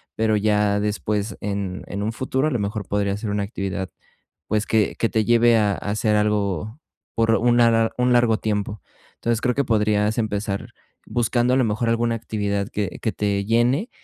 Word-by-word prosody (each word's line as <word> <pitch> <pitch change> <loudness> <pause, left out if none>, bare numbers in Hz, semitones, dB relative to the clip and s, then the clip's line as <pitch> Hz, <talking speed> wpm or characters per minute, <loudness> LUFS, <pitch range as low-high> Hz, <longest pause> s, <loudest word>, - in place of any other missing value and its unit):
pero 110 -1 +2
ya 105 -1 +2
después 105 0 -2
en 100 -2 -3
en 100 - -4
un 110 +2 -2
futuro, 130 +3 -1
a - - -1
lo 125 - 0
mejor 100 -1 -3
podría 100 -1 0
ser 105 0 -4
una 100 0 -1
actividad, 95 -2 -4 0.6
pues 110 0 0
que 110 -2 +1
que 115 - +1
te 110 -1 0
lleve 120 0 +4
a 105 -2 +2
hacer 105 +1 0
algo 105 - -1 0.3
por 115 -1 +2
una 115 -1 +3
un 125 0 +3
largo 120 -2 +4
tiempo. 105 -1 -3 0.3
Entonces 115 -1 -1
creo 125 0 +1
que 140 - +1
podrías 105 -1 +1
empezar 105 -2 -2 0.4
buscando 120 +1 +1
a - - +2
lo 130 - +3
mejor 110 +1 -1
alguna 115 0 +1
actividad 100 -3 -2
que 100 -2 -4
que 110 - -1
te 100 -1 -1
llene 120 - +1
110 Hz, 180 wpm, -22 LUFS, 105-115 Hz, 0.6 s, lleve